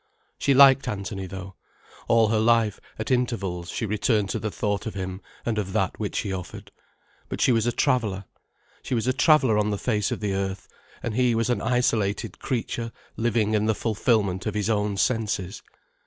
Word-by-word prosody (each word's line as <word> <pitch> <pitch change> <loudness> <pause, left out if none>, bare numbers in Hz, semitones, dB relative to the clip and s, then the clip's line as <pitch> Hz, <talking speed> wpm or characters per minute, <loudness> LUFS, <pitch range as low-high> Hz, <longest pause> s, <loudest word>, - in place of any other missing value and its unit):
She 140 - +3
liked 135 -1 +7
Anthony, 100 -3 -4
though. 95 0 -8 0.5
All 115 -2 +4
her 110 -1 +2
life, 115 -2 +3 0.2
at 110 - -4
intervals, 100 -9 -1
she 115 - -3
returned 105 0 +1
to - - -2
the 110 - -2
thought 105 +1 -2
of 110 - -5
him 95 0 -5 0.2
and 110 -2 0
of 95 -2 -4
that 95 -3 0
which 105 -2 -3
he 100 -3 -3
offered. 90 -2 -7 0.6
But - - -4
she - - +4
was 115 -1 +2
a - - +3
traveller, 110 -8 0 0.6
she - - -2
was 115 - 0
a 130 - +2
traveller 130 -6 +4
on 105 0 +1
the 105 - -1
face 105 -2 0
of - - -3
the 105 -2 -1
earth, 95 0 -3 0.4
and 115 - -2
he 125 0 +2
was 115 +1 +1
an 120 - 0
isolated 115 -5 0
creature 115 -1 -3 0.2
living 110 -2 +1
in 105 0 +2
the 110 - +2
fulfilment 105 -4 0
of 110 - -2
his 105 +1 0
own 105 -2 0
senses. 105 -5 -1
110 Hz, 190 wpm, -25 LUFS, 100-120 Hz, 0.6 s, liked